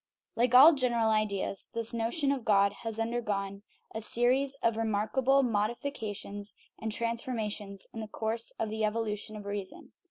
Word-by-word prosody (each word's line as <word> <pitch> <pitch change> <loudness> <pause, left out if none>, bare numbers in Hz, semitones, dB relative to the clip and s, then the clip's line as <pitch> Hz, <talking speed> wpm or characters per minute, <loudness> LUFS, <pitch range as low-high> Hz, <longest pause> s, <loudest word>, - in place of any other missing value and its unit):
Like 245 +1 +2
all 295 +6 +10
general 240 -5 +2
ideas, 200 -2 -1
this 230 0 -2
notion 235 +6 +1
of 270 -4 -2
God 200 -2 +4
has 225 -2 -3
undergone 210 -4 -2 0.3
a 220 - -4
series 255 +5 +1
of 230 -1 +3
remarkable 225 +5 +2
modifications 210 -3 -3 0.3
and 220 - -2
transformations 220 -4 -2
in 225 - -6
the 220 - -5
course 225 +2 -2
of 220 - -2
the 220 0 -2
evolution 215 -1 -2
of 210 -1 -8
rea 200 0 -2
son. 185 - -11
225 Hz, 155 wpm, -30 LUFS, 210-240 Hz, 0.3 s, all